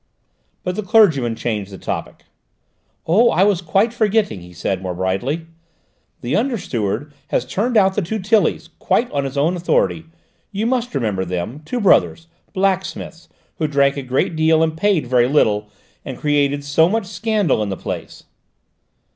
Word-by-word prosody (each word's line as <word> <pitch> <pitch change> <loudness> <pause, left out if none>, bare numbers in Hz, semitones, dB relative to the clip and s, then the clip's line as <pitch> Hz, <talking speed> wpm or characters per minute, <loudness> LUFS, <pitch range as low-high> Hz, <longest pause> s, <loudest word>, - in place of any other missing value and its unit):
But 180 0 -2
the 215 - -2
clergyman 165 - +3
changed 110 -4 -3
the 95 - -8
topic. - - -5 0.8
"Oh, 220 +9 +4
I 190 - +3
was 200 -3 +2
quite 195 +7 +1
forgetting," 215 - +1
he 90 +1 -13
said 90 +2 -3
more 90 -2 -4
brightly. 95 - -2 0.8
"The 120 - -1
under 240 +2 +1
steward 115 - -3
has 120 - -1
turned 220 - 0
out 195 -2 +4
the 205 - 0
two 200 +5 -3
Tillys, 210 +2 +1
quite 240 - +1
on 140 -1 -1
his 135 +1 -5
own 160 +6 +2
authority: 165 -1 0 0.5
you 210 +2 -2
must 245 - -1
remember 105 -8 -1
them, 90 - -4
two 245 - -3
brothers, 185 -5 +3 0.3
blacksmiths, 190 -3 -2 0.3
who 155 - +1
drank 140 -1 +2
a 140 - -3
great 130 +5 -1
deal 160 0 +3
and 160 -1 -1
paid 180 -3 +1
very 120 -1 +3
little, 105 -7 +2 0.3
and - - -7
created 145 -1 +1
so 155 +4 +3
much 225 0 -1
scandal 200 - 0
in 105 - -2
the 95 - -4
place." - - -7
160 Hz, 165 wpm, -19 LUFS, 120-200 Hz, 0.8 s, Oh